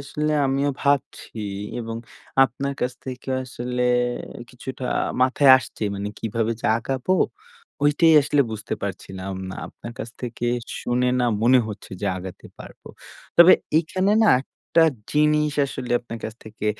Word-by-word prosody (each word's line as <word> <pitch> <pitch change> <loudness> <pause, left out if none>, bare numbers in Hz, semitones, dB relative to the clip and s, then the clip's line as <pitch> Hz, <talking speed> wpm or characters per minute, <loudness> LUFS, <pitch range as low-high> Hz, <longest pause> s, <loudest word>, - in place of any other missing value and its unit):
আসলে 150 +2 -2
আমিও 140 +2 +1
ভাবছি 140 -4 -1 0.4
এবং 115 -1 -5 0.5
আপনার 135 +3 -3
কাছ 125 0 0
থেকে 130 0 -7 0.2
আসলে 125 0 -3 0.7
কিছুটা 130 +1 -7 0.4
মাথায় 130 +2 +5
আসছে, 120 - -9
মানে 100 +1 -3
কিভাবে 115 +1 -1
যে - - -2
আগাবো? 130 +8 -2 0.7
ঐটাই 155 +3 +5
আসলে 145 +1 +2
বুঝতে 110 -1 -4
পারছিলাম 95 -1 -5 0.2
না। - - -6
আপনার 120 - -10
কাছ 125 - -5
থেকে 120 0 -3 0.3
শুনে 125 +1 +1
না, - - +2 0.2
মনে 125 +2 +6
হচ্ছে 105 -1 -9
যে 100 - -2
আগাতে 90 -1 -9
পারবো। - - -12 0.5
তবে 170 +2 +9 0.3
এখানে 185 +5 0
না - - +5
একটা 165 +4 0 0.3
জিনিস 150 0 +3
আসলে 130 -2 -5
আপনার 115 -1 -8
কাছ 110 - -5
থেকে 110 0 -6
125 Hz, 140 wpm, -23 LUFS, 115-145 Hz, 0.7 s, তবে